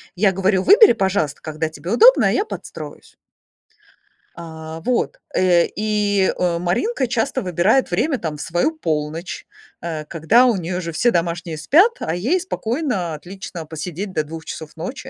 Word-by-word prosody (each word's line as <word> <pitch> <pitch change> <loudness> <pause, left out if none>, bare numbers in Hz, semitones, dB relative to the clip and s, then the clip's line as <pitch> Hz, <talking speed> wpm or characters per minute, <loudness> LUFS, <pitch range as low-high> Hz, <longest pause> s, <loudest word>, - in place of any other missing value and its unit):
Я 195 +1 +3
говорю: 190 0 +1
"Выбери, 425 +4 +7
пожалуйста, 190 -8 -1
когда 155 0 -3
тебе 160 +5 -7
удобно, 485 - +6
а - - +2
я 405 - +1
подстроюсь". - - -9 1.2
А, 160 -1 -8
вот. 250 +6 -1
Э, 175 -2 +3
и, 205 -2 0
э, 175 -2 0
Маринка 255 - 0
часто 260 +2 -1
выбирает 185 +8 +2
время 270 - 0
там 155 -3 -4
в - - -7
свою 175 - 0
полночь, 160 - -3 0.4
э, 160 -2 -4
когда 170 +11 +3
у 235 -5 +2
неё 180 +1 -3
уже 170 -2 -5
все 235 +9 +2
домашние 170 -1 -2
спят, 340 - +4
а 160 - -2
ей 240 - 0
спокойно, 235 - -2
отлично 175 +1 -8
посидеть 170 +5 -6
до 155 -4 -1
2 160 +1 -9
часов 160 -1 -8
ночи, 260 +10 -7
180 Hz, 160 wpm, -20 LUFS, 165-230 Hz, 1.2 s, Выбери